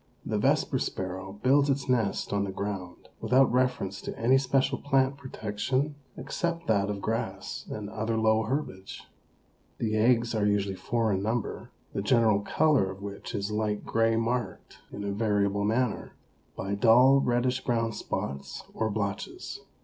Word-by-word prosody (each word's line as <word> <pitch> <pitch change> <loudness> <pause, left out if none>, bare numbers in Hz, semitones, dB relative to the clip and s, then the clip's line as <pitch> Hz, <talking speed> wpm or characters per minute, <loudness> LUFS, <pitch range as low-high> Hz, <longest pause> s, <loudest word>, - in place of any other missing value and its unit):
The - - -1
Vesper - - +2
Sparrow 95 +1 -4
builds 140 +2 +4
its 135 -2 0
nest 115 -6 0
on 100 0 +1
the 100 - -3
ground 95 -3 -5
without 130 0 +4
reference 125 -7 0
to - - -6
any 130 +4 +4
special 135 0 +1
plant 135 -1 +2
protection 130 +2 -2 0.2
except 170 -2 -3
that 100 -6 +2
of 100 -1 -4
grass 110 -4 -3
and 105 -1 -5
other 110 +2 -2
low 110 0 +3
herbage. 110 -6 -4 0.7
The 110 -1 -1
eggs 115 +1 +3
are 105 -2 +1
usually 100 -1 +1
four 110 +3 0
in 95 - 0
number, 110 +2 -2 0.2
the - - -1
general 110 -1 +3
color 130 0 +2
of 95 +1 -9
which 100 +3 -6
is 100 +1 -2
light 105 -1 -1
gray 115 0 +2
marked, 115 -3 -2
in 100 - -6
a 100 - -2
variable 100 -1 +1
manner, 115 +1 -1 0.4
by 95 +1 -3
dull 125 +6 +6
reddish 125 0 +1
brown 115 -2 0
spots 70 -9 -5
or 110 - -1
blotches. 100 -1 -4
110 Hz, 155 wpm, -28 LUFS, 100-125 Hz, 0.7 s, dull